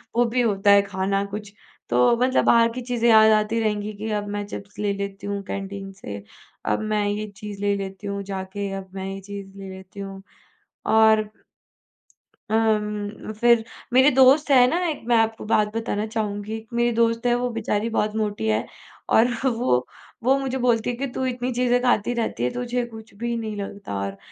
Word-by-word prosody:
वो 240 +1 +4
भी 245 +2 +1
होता 205 -3 +3
है 200 0 +7
खाना 195 0 -1
कुछ। 205 0 -7 0.4
तो 125 - +4
मतलब 255 +2 +2
बाहर 230 0 +5
की 250 +2 -5
चीज़ें 240 -1 +1
याद 220 0 +7
आती 215 +2 +2
रहेंगी 210 -1 -1
कि 215 +2 -5
अब 205 -1 -2
मैं 205 0 -3
चिप्स 200 0 -9
ले 205 -1 0
लेती 200 0 -5
हूँ 200 0 -2
कैंटीन 195 0 -5
से, 100 - -8 0.4
अब - - +1
मैं 215 -1 0
ये 210 +1 -2
चीज़ 205 -1 -7
ले 205 0 +2
लेती 195 +1 -6
हूँ 200 0 -3
जाके, 195 +1 -4
अब 195 -1 -6
मैं 190 0 -4
ये 195 - -6
चीज़ 200 0 -9
ले 195 -1 -8
लेती 190 +1 -12
हूँ। 195 -1 -7 0.6
और 220 -1 +4 1.2
अम्म, 210 -1 0
फिर 235 +1 +4 0.3
मेरे 260 +3 +7
दोस्त 270 +3 +6
हैं 250 -2 +7
ना 330 - +1
एक 310 - -3
मैं 240 - +4
आपको 225 -1 0
बात 210 -1 +3
बताना 220 -2 -1
चाहूँगी, 210 -1 -3
एक 220 0 -12
मेरी 240 0 +2
दोस्त 230 0 +2
है 240 - +4
वो 245 0 -1
बेचारी 225 -1 -1
बहुत 210 0 0
मोटी 215 0 -1
है 215 - +1 0.5
और 225 +2 +6 0.2
वो 235 - +2 0.5
वो 265 +2 +4
मुझे 265 -1 -2
बोलती 240 -2 +1
है 245 - -2
कि 275 +3 -3
तू 260 - -2
इतनी 250 0 -2
चीज़ें 245 0 +2
खाती 245 -2 +2
रहती 120 - -2
है 125 - +2
तुझे 245 0 -2
कुछ 220 -1 -12
भी 235 0 -1
नहीं 215 -2 -4
लगता 200 - -6
और 100 0 -4
215 Hz, 195 wpm, -23 LUFS, 200-235 Hz, 1.2 s, है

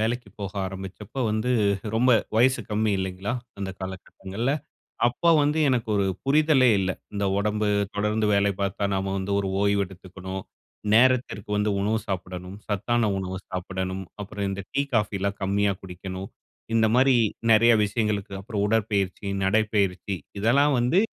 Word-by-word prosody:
வேலைக்கு 115 0 -1
போக 100 -1 -4
ஆரம்பிச்சப்போ 95 +6 -7
வந்து, 110 +3 0 0.4
ரொம்ப 125 +3 +4 0.3
வயசு 130 +3 +4
கம்மி 105 0 +1
இல்லைங்களா? 95 +2 -3 0.3
அந்த 95 -1 -3
காலகட்டங்கள்ல! 95 +5 -4 0.6
அப்போ 145 +8 +1
வந்து, 150 +2 +1
எனக்கு 120 -4 0
ஒரு 100 -1 +2 0.2
புரிதலே 145 -2 +4
இல்லை. 95 -1 -1 0.2
இந்த 100 0 -1
உடம்பு 105 +1 0 0.3
தொடர்ந்து 105 +1 +1
வேலை 100 0 +3
பார்த்தா, 100 +1 -1
நாம 95 0 -1
வந்து 95 +1 -3
ஒரு 100 -1 -1
ஓய்வு 100 0 +3
எடுத்துக்கணும். 95 0 -8 0.5
நேரத்திற்கு 120 -3 +3
வந்து 105 +1 +1
உணவு 110 +3 +1
சாப்பிடணும். 90 0 -5
சத்தான 110 +3 +1
உணவு 95 -1 -4
சாப்பிடணும். 95 +1 -4 0.2
அப்பறம் 100 0 -4
இந்த 100 0 -4
டீ 140 - +2
காஃபிலாம் 100 -2 0
கம்மியா 100 +1 +2
குடிக்கணும். 95 +1 -7 0.4
இந்த 115 -1 +4
மாரி 130 0 +5 0.4
நிறைய 115 +2 +6
விஷயங்களுக்கு 105 -2 -1
அப்பறம், 100 0 -3
உடற்பயிற்சி, 105 -3 0 0.2
நடைப்பயிற்சி, 100 -2 +1 0.2
இதல்லாம் 140 +7 +4
வந்து 125 +10 +3
100 Hz, 135 wpm, -25 LUFS, 95-115 Hz, 0.6 s, நிறைய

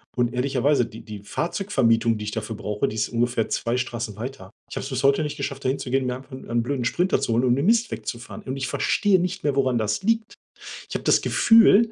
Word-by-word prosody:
Und 120 -1 +1
ehrlicherweise, 130 0 +1
die 110 - -11
die 105 -2 -8
Fahrzeugvermietung, 115 - +1
die 105 - -6
ich 105 - -3
dafür 110 +1 -4
brauche, 105 0 -2
die 110 - -5
ist 110 - 0
ungefähr 120 -1 0
2 120 +1 -1
Straßen 120 -4 -3
weiter. 120 -5 -7 0.2
Ich - - -8
habe - - -3
es 135 - -5
bis 130 0 -3
heute 140 +2 +4
nicht 150 +1 -4
geschafft, 140 -1 -4
dahin 130 +2 0
zu 125 - -6
gehen, 130 -1 +1
mir 125 - -1
einfach 130 +2 -12
'n 130 - -9
'n 120 0 +1
blöden 125 -1 -2
Sprinter 180 +9 +1
zu 115 - 0
holen 120 +3 +2
um 120 - +3
den 140 +5 -1
Mist 230 0 +3
wegzufahren. 120 -1 -6
Und 130 +1 -4
ich 130 - -2
verstehe 200 -3 +2
nicht 180 0 -3
mehr, 145 -2 +1
woran 130 -3 +2
das 105 -1 -1
liegt. 225 +1 0 0.5
Ich - - -9
habe - - -3
das - - +4
Gefühl, 225 0 +5
130 Hz, 245 wpm, -24 LUFS, 115-145 Hz, 0.5 s, Gefühl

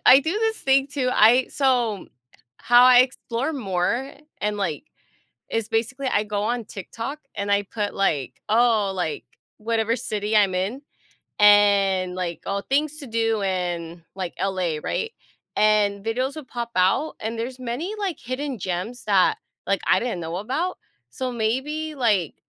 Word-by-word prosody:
I 260 - +10
do 300 +3 -2
this 445 +2 0
thing 270 0 +3
too, 275 -3 -1
I 240 +4 +6
so, 245 -7 0 0.5
how 245 +1 +5
I 255 -1 +8
explore 255 +2 -1
more, 235 +3 -1 0.3
and, 210 0 -1
like 195 - -3 0.7
is 225 -2 -1
basically, 245 +4 -1
I 210 -3 +1
go 205 -1 -2
on 235 +2 -1
TikTok, 230 +9 -6
and 200 0 -3
I 200 0 +3
put, 205 +1 -4
like, 145 -10 -1
"Oh," 220 -3 +3
like, 175 -5 -3 0.3
whatever 225 +1 0
city 210 -1 -2
I'm 200 -3 +4
in 200 +9 -2 0.6
and 200 -3 +5
like, 175 -2 -3
"Oh, 200 0 -2
things 295 +2 0
to 280 - -8
do 225 -2 0
in, 175 -3 -3
like, 185 -3 -4
LA," 185 -5 -1
right? 455 +1 -2 0.4
And 205 -2 +2
videos 255 +5 -1
will 310 - -7
pop 235 -2 -5
out, 190 +12 +2
and 225 +1 -4
there's 250 +3 -4
many, 255 - -4
like, 390 -5 -2
hidden 255 +1 -4
gems 190 +7 -4
that, 195 -3 +3 0.3
like, 195 -1 +1
I 185 - +4
didn't 235 -7 -2
know 165 +1 -4
about, 300 - -2 0.3
so 255 - -3
maybe, 265 +8 -2
like, 210 - +1
225 Hz, 155 wpm, -23 LUFS, 195-255 Hz, 0.7 s, I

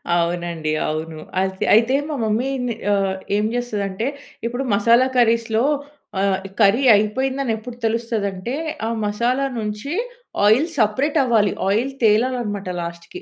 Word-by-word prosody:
అవునండి. 170 -2 -1 0.2
అవును. 155 +1 -4 0.2
అయి 190 0 -1
అయితే 230 +5 +4
మా 295 - -2
మమ్మీ 225 +5 0 0.4
ఆహ్, 195 -1 +1 0.2
ఏం 210 +1 +1
చేస్తదంటే 215 -2 -2 0.4
ఇప్పుడు 245 +3 -2
మసాలా 235 +5 +4
కర్రీస్‌లో 230 -1 +3 0.6
ఆహ్, 195 -1 +2 0.2
కర్రీ 210 +7 +4
అయిపోయిందని 260 +4 0
ఎప్పుడు 240 +2 -9
తెలుస్తదంటే 225 -2 -2 0.3
ఆహ్, 230 0 -2
మసాలా 240 +6 0
నుంచి 210 +8 -4 0.5
ఆయిల్ 245 +10 +5
సెపరేటవ్వాలి 240 -1 +2 0.2
ఆయిల్ 235 +7 +1
తేలాలన్నమాట 215 -3 +1
లాస్ట్‌కి. 170 - -8
220 Hz, 115 wpm, -21 LUFS, 195-245 Hz, 0.6 s, ఆయిల్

